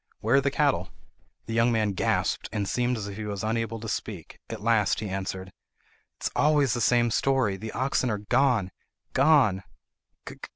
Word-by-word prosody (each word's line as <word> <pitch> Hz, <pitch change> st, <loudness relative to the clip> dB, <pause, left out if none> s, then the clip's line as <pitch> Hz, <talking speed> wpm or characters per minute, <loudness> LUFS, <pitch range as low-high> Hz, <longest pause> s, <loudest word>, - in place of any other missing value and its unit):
"Where 115 Hz, +5 st, +2 dB
are -, -, +4 dB
the 140 Hz, -, +1 dB
cattle?" 140 Hz, -, +1 dB, 0.6 s
The 115 Hz, -, -5 dB
young 115 Hz, +1 st, +3 dB
man 110 Hz, -3 st, +1 dB
gasped, 95 Hz, -, -1 dB
and 100 Hz, -2 st, -2 dB
seemed 125 Hz, +3 st, 0 dB
as 105 Hz, -2 st, -5 dB
if 100 Hz, -1 st, -7 dB
he 110 Hz, -, -5 dB
was 100 Hz, -1 st, -4 dB
unable 115 Hz, 0 st, -2 dB
to 115 Hz, -, -7 dB
speak. 100 Hz, -5 st, -5 dB
At -, -, -5 dB
last 115 Hz, -3 st, +2 dB
he 110 Hz, -, -4 dB
answered: 95 Hz, -1 st, -4 dB
"It -, -, -25 dB
is -, -, 0 dB
always 145 Hz, -4 st, +3 dB
the 120 Hz, -, -2 dB
same 120 Hz, -1 st, +3 dB
story! 130 Hz, -6 st, +1 dB
The 110 Hz, +3 st, -7 dB
oxen 130 Hz, 0 st, 0 dB
are—gone—gone!" 120 Hz, -, +1 dB
115 Hz, 170 wpm, -26 LUFS, 100-125 Hz, 0.6 s, are